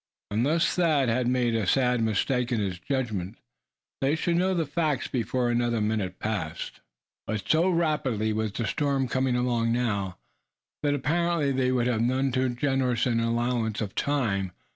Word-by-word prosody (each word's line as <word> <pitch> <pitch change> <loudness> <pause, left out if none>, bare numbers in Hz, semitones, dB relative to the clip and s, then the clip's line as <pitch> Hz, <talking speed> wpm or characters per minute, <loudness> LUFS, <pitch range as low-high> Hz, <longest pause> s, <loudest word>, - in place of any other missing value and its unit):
Unless 140 +11 +2
Thad 155 -8 +2
had 120 +2 +1
made 125 -2 +1
a 110 -4 0
sad 125 -1 +2
mistake 120 +3 0
in 120 - +1
his 95 -4 -2
judgment, 110 -8 -3 0.6
they 135 +3 +2
should 170 +1 0
know 185 +2 +2
the 165 -2 +1
facts 150 -1 -1
before 120 0 0
another 120 -1 +1
minute 105 -4 -1
passed. 90 -7 -4 0.5
But 105 -3 -3
so 165 +4 +3
rapidly 150 - 0
was 110 -1 -1
the 115 +3 -3
storm 135 +3 0
coming 130 0 0
along 120 -2 +1
now, 100 -6 -1 0.6
that 145 -1 +1
apparently 160 +1 +1
they 130 -1 +1
would 125 -2 +1
have 120 -3 +1
none 130 +3 +1
too 130 +1 +1
generous 125 -1 0
an 120 -2 +1
allowance 115 -1 0
of 105 -3 -3
time. 105 -11 0
125 Hz, 165 wpm, -27 LUFS, 110-140 Hz, 0.6 s, so